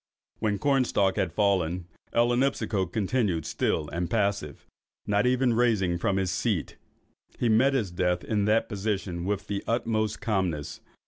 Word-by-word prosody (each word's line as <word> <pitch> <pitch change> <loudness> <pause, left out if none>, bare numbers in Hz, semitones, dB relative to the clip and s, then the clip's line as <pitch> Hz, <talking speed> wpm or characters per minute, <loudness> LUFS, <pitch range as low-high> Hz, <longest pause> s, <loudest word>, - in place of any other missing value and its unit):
When 105 -2 0
Cornstalk 125 -7 +2
had 90 - 0
fallen, 90 -3 +1 0.3
Ellinipsico 120 -5 +1
continued 100 - 0
still 75 -2 -1
and 85 0 -3
passive, 100 -9 -1 0.4
not 105 +3 +2
even 125 -1 +2
raising 110 -6 +2
himself 85 0 -3
from 95 - +1
his 95 -2 0
seat. 95 -3 -1 0.6
He 120 - +1
met 130 +5 +4 0.2
death 90 -1 0
in 105 -3 0
that 110 +2 +2
position 100 -4 -3
with 100 +1 -2
the 100 -1 -3
utmost 110 -2 0
calmness. 95 -9 -2
100 Hz, 140 wpm, -27 LUFS, 90-115 Hz, 0.6 s, met